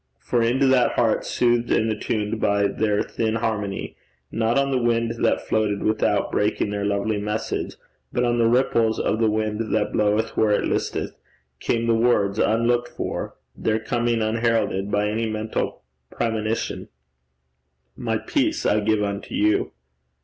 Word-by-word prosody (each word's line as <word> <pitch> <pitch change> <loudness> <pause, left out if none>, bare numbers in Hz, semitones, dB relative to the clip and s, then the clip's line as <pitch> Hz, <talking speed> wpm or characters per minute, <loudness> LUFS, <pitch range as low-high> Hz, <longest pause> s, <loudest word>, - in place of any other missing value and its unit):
For 120 - -1
into 125 +4 +2
that 130 -2 +4
heart, - - +1
soothed 120 -1 +1
and 110 0 +2
attuned 110 0 -2
by 100 0 +2
their 105 0 +1
thin 110 -1 -2
harmony, 105 -3 -3 0.4
not 115 +2 +1
on 140 0 +2
the 130 -2 +1
wind 115 -1 0
that - - +1
floated 105 -2 0
without 110 0 +1
breaking 105 0 0
their 100 -1 -2
lovely 100 +1 0
message, 105 +2 -3 0.4
but 125 - 0
on 120 0 +1
the 115 - +4
ripples 115 -2 +2
of 110 - 0
the 110 -1 +3
wind 110 +1 -2
that 105 -1 0
bloweth 105 +2 +1
where 110 - +3
it - - +1
listeth, - - -2 0.5
came 115 0 0
the 115 - +3
words, 115 -3 +2
unlooked 120 +2 +2
for, - - -5 0.2
their 110 - 0
coming 120 0 0
unheralded 110 -3 0
by 105 0 +1
any 110 +2 -1
mental 110 0 -3 0.3
premonition, 110 -1 -2 1.1
'My - - -1
peace - - -1
I 105 - +3
give 105 0 +1
unto 100 0 -4
you.' 105 0 +2
110 Hz, 155 wpm, -23 LUFS, 105-115 Hz, 1.1 s, that